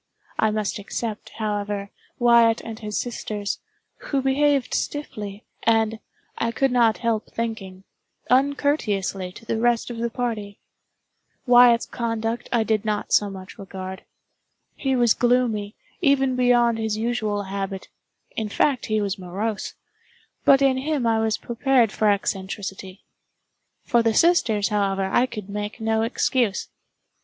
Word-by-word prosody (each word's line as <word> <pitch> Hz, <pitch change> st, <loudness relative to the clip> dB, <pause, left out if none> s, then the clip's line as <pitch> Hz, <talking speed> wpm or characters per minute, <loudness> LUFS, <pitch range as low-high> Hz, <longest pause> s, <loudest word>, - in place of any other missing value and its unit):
I 220 Hz, -, +4 dB
must 215 Hz, 0 st, -2 dB
except, 215 Hz, +1 st, -5 dB
however, 205 Hz, -2 st, -3 dB, 0.3 s
Wyatt 235 Hz, -1 st, +5 dB
and 225 Hz, -1 st, -8 dB
his 210 Hz, -2 st, -4 dB
sisters, 210 Hz, -4 st, -3 dB, 0.4 s
who 275 Hz, -2 st, -2 dB
behaved 275 Hz, -1 st, +2 dB
stiffly, 210 Hz, -8 st, -4 dB, 0.2 s
and, 225 Hz, -1 st, +2 dB, 0.4 s
I 230 Hz, -, 0 dB
could 270 Hz, +3 st, +1 dB
not 235 Hz, -3 st, +3 dB
help 230 Hz, -2 st, -1 dB
thinking, 195 Hz, -5 st, -5 dB, 0.4 s
uncourteously 250 Hz, -9 st, +1 dB
to 230 Hz, -, -13 dB
the 225 Hz, -, -1 dB
rest 240 Hz, 0 st, +1 dB
of 235 Hz, -, -6 dB
the 235 Hz, 0 st, -1 dB
party. 225 Hz, -5 st, -4 dB, 0.9 s
Wyatt's 245 Hz, -1 st, +6 dB
conduct 230 Hz, 0 st, -3 dB
I 235 Hz, -2 st, +2 dB
did 220 Hz, -1 st, 0 dB
not 210 Hz, -2 st, -2 dB
so 205 Hz, -, +4 dB
much 190 Hz, +2 st, -10 dB
regard. 190 Hz, -1 st, -7 dB, 0.7 s
He 270 Hz, -2 st, -1 dB
was 240 Hz, -3 st, +4 dB
gloomy, 240 Hz, -4 st, +1 dB, 0.3 s
even 270 Hz, -4 st, +3 dB
beyond 240 Hz, -2 st, +3 dB
his 220 Hz, -1 st, -1 dB
usual 215 Hz, -3 st, -1 dB
habit—in 195 Hz, +2 st, -6 dB
fact 270 Hz, +5 st, +1 dB
he 215 Hz, -1 st, +1 dB
was 200 Hz, -1 st, -2 dB
morose—but 210 Hz, +7 st, -2 dB
in 265 Hz, -1 st, +3 dB
him 280 Hz, -1 st, -1 dB
I 225 Hz, -1 st, +2 dB
was 220 Hz, -1 st, +1 dB
prepared 240 Hz, -2 st, +2 dB
for 215 Hz, -1 st, +2 dB
eccentricity. 195 Hz, -1 st, -3 dB, 0.8 s
For 235 Hz, -, +3 dB
the 225 Hz, -1 st, +1 dB
sisters, 230 Hz, -, +3 dB
however, 195 Hz, -2 st, 0 dB
I 240 Hz, +6 st, +2 dB
could 210 Hz, -6 st, -7 dB
make 210 Hz, +2 st, -5 dB
no 220 Hz, 0 st, +1 dB
excuse. 230 Hz, -2 st, 0 dB
225 Hz, 130 wpm, -23 LUFS, 205-245 Hz, 0.9 s, Wyatt's